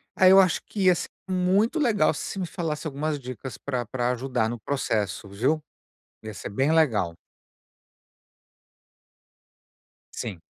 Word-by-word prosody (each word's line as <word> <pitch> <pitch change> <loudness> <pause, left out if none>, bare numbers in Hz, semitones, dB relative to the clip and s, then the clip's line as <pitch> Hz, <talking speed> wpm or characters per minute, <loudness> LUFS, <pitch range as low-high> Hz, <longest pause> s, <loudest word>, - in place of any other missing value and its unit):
Aí, 185 0 +6
eu 195 - +9
acho 185 -3 +3
que 205 - -3
ia 180 -1 +6
ser - - -4 0.2
muito 190 - +2
legal 215 - +3
se - - -5
você 195 - -5
me 180 - -2
falasse 160 -3 -3
algumas 150 +1 -2
dicas 130 -1 -7
pra 125 -4 -3
pra 120 +2 -1
ajudar 125 -2 -1
no 120 -1 -5
processo, 105 -7 -2
viu? 130 +11 0 0.6
Ia 110 - -6
ser 100 - -7
bem 135 +9 +1
legal. 105 - +2 3.0
Sim. 100 -9 -6
140 Hz, 140 wpm, -26 LUFS, 115-180 Hz, 3.0 s, eu